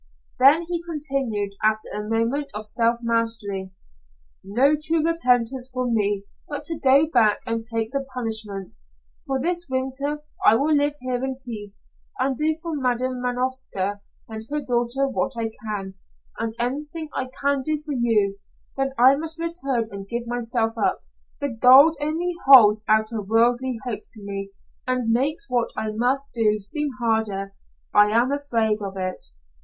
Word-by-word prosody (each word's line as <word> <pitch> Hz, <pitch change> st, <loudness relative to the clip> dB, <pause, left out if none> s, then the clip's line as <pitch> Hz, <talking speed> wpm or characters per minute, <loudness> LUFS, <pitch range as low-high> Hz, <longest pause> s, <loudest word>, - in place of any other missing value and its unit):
Then 285 Hz, +6 st, +6 dB
he 340 Hz, 0 st, -3 dB
continued, 275 Hz, -11 st, -2 dB
after 215 Hz, 0 st, +1 dB
a 210 Hz, 0 st, -4 dB
moment 235 Hz, +6 st, 0 dB
of 215 Hz, +1 st, -5 dB
self 230 Hz, +2 st, +1 dB
mastery: 225 Hz, -5 st, -1 dB, 0.7 s
"No 260 Hz, +9 st, +3 dB
true 310 Hz, +1 st, 0 dB
repentance 255 Hz, -5 st, +1 dB
for 250 Hz, -1 st, -2 dB
me 205 Hz, -3 st, 0 dB, 0.2 s
but 290 Hz, -, -5 dB
to 330 Hz, -2 st, 0 dB
go 275 Hz, +2 st, +5 dB
back 235 Hz, -9 st, +3 dB
and 230 Hz, -1 st, -2 dB
take 225 Hz, 0 st, -3 dB
the 275 Hz, 0 st, -2 dB
punishment. 220 Hz, -6 st, -2 dB, 0.5 s
For 270 Hz, -1 st, 0 dB
this 345 Hz, +4 st, 0 dB
winter 265 Hz, +3 st, -2 dB, 0.2 s
I 215 Hz, -, +6 dB
will 290 Hz, +6 st, +2 dB
live 290 Hz, 0 st, +2 dB
here 255 Hz, 0 st, -2 dB
in 265 Hz, -1 st, -3 dB
peace, 210 Hz, -4 st, -8 dB, 0.3 s
and 265 Hz, -4 st, 0 dB
do 310 Hz, +4 st, +1 dB
for 335 Hz, -2 st, -3 dB
Madam 255 Hz, -1 st, -1 dB
Manovska 245 Hz, -6 st, -2 dB, 0.3 s
and 220 Hz, -1 st, -7 dB
her 300 Hz, +1 st, -1 dB
daughter 245 Hz, +2 st, 0 dB
what 270 Hz, 0 st, -1 dB
I 225 Hz, -1 st, -2 dB, 0.2 s
can, 195 Hz, -3 st, -4 dB, 0.5 s
and 225 Hz, -1 st, -3 dB
anything 295 Hz, +6 st, -3 dB
I 255 Hz, -, -2 dB
can 280 Hz, -1 st, +1 dB
do 310 Hz, +3 st, -1 dB
for 300 Hz, 0 st, -6 dB
you, 215 Hz, -5 st, +1 dB, 0.4 s
then 270 Hz, 0 st, -1 dB
I 255 Hz, +3 st, +7 dB
must 320 Hz, +2 st, -2 dB
return 275 Hz, -9 st, -1 dB
and 200 Hz, 0 st, -7 dB
give 235 Hz, 0 st, -3 dB
myself 235 Hz, -1 st, -1 dB
up. -, -, +1 dB, 0.4 s
The 285 Hz, -, -1 dB
gold 260 Hz, +6 st, +7 dB
only 325 Hz, +4 st, -1 dB
holds 215 Hz, -6 st, +8 dB
out 215 Hz, +1 st, +3 dB
a 225 Hz, -2 st, -3 dB
worldly 240 Hz, +4 st, +1 dB
hope 230 Hz, -4 st, -4 dB
to 215 Hz, -, -11 dB
me, 195 Hz, 0 st, -5 dB, 0.4 s
and 250 Hz, -3 st, 0 dB
makes 275 Hz, +6 st, 0 dB
what 245 Hz, -2 st, 0 dB
I 215 Hz, 0 st, -2 dB
must 255 Hz, +5 st, 0 dB
do 215 Hz, -2 st, +2 dB
seem 295 Hz, +9 st, -1 dB
harder. 220 Hz, -4 st, -1 dB, 0.4 s
I 205 Hz, 0 st, +6 dB
am 235 Hz, +5 st, +2 dB
afraid 230 Hz, -7 st, 0 dB
of 195 Hz, -1 st, -5 dB
it." 185 Hz, -1 st, -3 dB
245 Hz, 160 wpm, -23 LUFS, 220-275 Hz, 0.7 s, holds